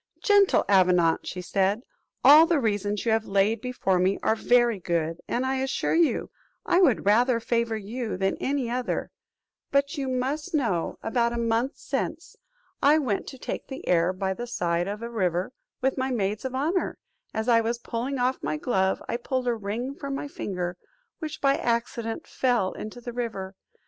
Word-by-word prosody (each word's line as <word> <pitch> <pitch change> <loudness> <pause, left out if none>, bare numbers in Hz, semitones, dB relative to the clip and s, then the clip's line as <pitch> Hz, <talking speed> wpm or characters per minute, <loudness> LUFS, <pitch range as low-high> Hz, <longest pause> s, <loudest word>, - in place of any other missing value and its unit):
"Gentle 405 -2 +4
Avenant," 180 -4 +3
said 190 +4 0
she, - - -44 0.3
"all 310 +3 +9
the 330 -3 +2
reasons 205 -3 -1
you 230 - +2
have 220 0 +1
laid 200 +3 +2
before 245 -7 0
me, 185 +2 +2
are 220 - +3
very 240 -2 +3
good, 165 -1 -2
and 250 +2 -1
I 265 0 0
assure 265 0 -1
you, 330 -1 +2 0.3
I 355 - +3
would 275 - +3
rather 235 +4 +4
favour 230 -1 0
you 220 +1 -4
than 195 0 0
any 275 -2 -1
other; 245 +1 -2 0.6
but 280 +2 +1
you 270 - -2
must 275 +7 -2
know, 210 - 0
about 235 +1 +1
a - - -3
month 235 +3 0
since, - - -4 0.5
I 295 +2 +6
went 250 -10 -1
to 265 - -8
take - - -5
the 265 0 -8
air 175 0 +3
by 190 +1 -2
the 240 +5 -6
side 175 -6 -1
of 210 +3 -5
a 235 - -4
river, 185 0 -1 0.3
with 265 0 0
my 260 +1 0
maids 215 -2 -1
of 260 0 -3
honour; 325 +7 0 0.3
as 220 +1 -3
I 230 -2 +5
was 230 +1 -1
pulling 240 +3 -3
off 250 +1 0
my 155 - -2
glove, 190 +2 0
I - - -1
pulled 255 +1 -2
a 240 - +3
ring 225 +5 -4
from 280 -1 -5
my 290 - -4
finger, 180 -9 -4 0.4
which 310 -2 -6
by 275 0 +3
accident 235 -1 -2
fell 240 -7 +1
into 215 +3 -8
the 240 0 -6
river. 215 -6 -4
235 Hz, 185 wpm, -26 LUFS, 195-260 Hz, 0.6 s, all